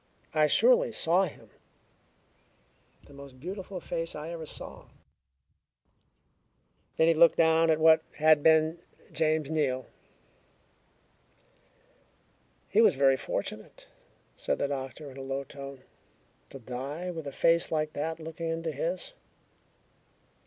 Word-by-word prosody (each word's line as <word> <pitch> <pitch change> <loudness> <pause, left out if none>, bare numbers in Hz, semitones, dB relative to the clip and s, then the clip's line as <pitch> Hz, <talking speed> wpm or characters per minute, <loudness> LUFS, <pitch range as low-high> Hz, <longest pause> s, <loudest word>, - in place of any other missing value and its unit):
"I 155 -1 +4
surely - - +4
saw 180 +4 +2
him. 160 - -12 1.5
The 145 - -17
most 140 -2 -13
beautiful 185 +4 -6
face 165 -1 -4
I 150 +2 -6
ever 165 -2 -7
saw." - - -8 2.1
Then 160 - +4
he 165 - +5
looked 165 +1 +5
down 165 0 +4
at 160 -1 +3
what 160 0 +6 0.2
had 155 -1 +5
been 160 +1 +3 0.3
James 155 -1 0
Neal. 135 -5 0 2.8
"He 220 - +3
was 225 - +5
very 135 0 +4
fortunate," - - -6 0.5
said - - -2
the - - -1
doctor 140 +1 -6
in 130 - -13
a - - -7
low 135 +1 -4
tone, 140 -1 -10 0.7
"to - - -9
die 135 +8 -6
with 160 -4 -7
a - - -4
face 165 +4 +2
like 155 -1 -1
that 160 +2 -3
looking 165 +1 -6
into 165 0 -3
his." 170 - -4
155 Hz, 125 wpm, -28 LUFS, 140-165 Hz, 2.8 s, what